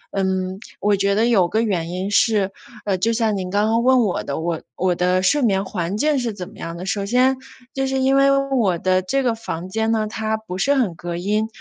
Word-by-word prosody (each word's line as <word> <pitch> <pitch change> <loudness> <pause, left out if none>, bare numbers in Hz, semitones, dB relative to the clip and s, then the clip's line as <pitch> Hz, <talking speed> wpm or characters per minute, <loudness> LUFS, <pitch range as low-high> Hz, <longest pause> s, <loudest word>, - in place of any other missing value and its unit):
嗯， 190 -1 -1 0.2
我 205 0 +2
觉 200 0 +1
得 220 +2 +3
有 200 -7 +4
个 220 - +1
原 180 -7 -1
因 185 +3 -3
是， 205 -2 +2 0.3
呃， 195 -2 +1
就 230 +4 +1
像 225 -2 +1
您 185 -2 -4
刚 205 +2 +1
刚 230 +1 +2
问 260 0 +5
我 205 -6 0
的， 140 - -4
我 165 0 -2
我 180 -1 +1
的 180 +1 +1
睡 290 +10 +3
眠 200 -5 +1
环 185 0 -3
境 295 +3 +2
是 240 -3 -2
怎 185 -3 -7
么 - - -17
样 165 0 -6
的？ 180 - -6
首 200 0 -1
先 255 +4 +3 0.4
就 270 0 -1
是 265 - -1
因 265 +1 +3
为 275 0 +5 0.3
我 195 -8 +2
的 185 +2 +1
这 270 +9 -1
个 240 - +2
房 185 -5 -6
间 220 +3 0
呢， 220 -1 +1
它 220 0 -2
不 190 -4 -7
是 280 +7 +2
很 230 -10 +1
隔 175 0 -5
音， 210 +4 0
205 Hz, 255 characters per minute, -21 LUFS, 185-230 Hz, 0.4 s, 问